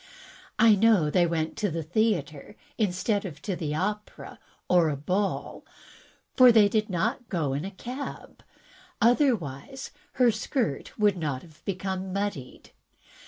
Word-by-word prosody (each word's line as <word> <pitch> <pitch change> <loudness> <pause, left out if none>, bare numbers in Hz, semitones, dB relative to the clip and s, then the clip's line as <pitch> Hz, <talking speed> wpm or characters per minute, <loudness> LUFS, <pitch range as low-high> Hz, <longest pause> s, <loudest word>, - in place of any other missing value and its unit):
I 225 0 +6
know 205 -7 +4
they 175 +1 +3
went 160 -1 -2
to 205 - 0
the 165 0 -3
theatre, 175 -3 -1 0.2
instead 200 0 0
of 180 -7 -7
to 195 - -2
the 150 -3 -3
opera 210 +5 -4 0.3
or 175 -3 +4
a 145 - -2
ball, 185 +8 -2 0.7
for 255 -1 +8
they 220 -3 +6
did 215 +1 0
not 230 +7 -2
go 155 -7 -1
in 145 +5 -3
a - - -4
cab, 250 +8 -8 0.6
otherwise 240 - 0 0.2
her 250 -2 +4
skirt 220 - -3
would 205 -3 +3
not 145 -6 -3
have 155 -1 -18
become 190 0 -3
muddied. 195 -10 -5
195 Hz, 140 wpm, -27 LUFS, 160-220 Hz, 0.7 s, for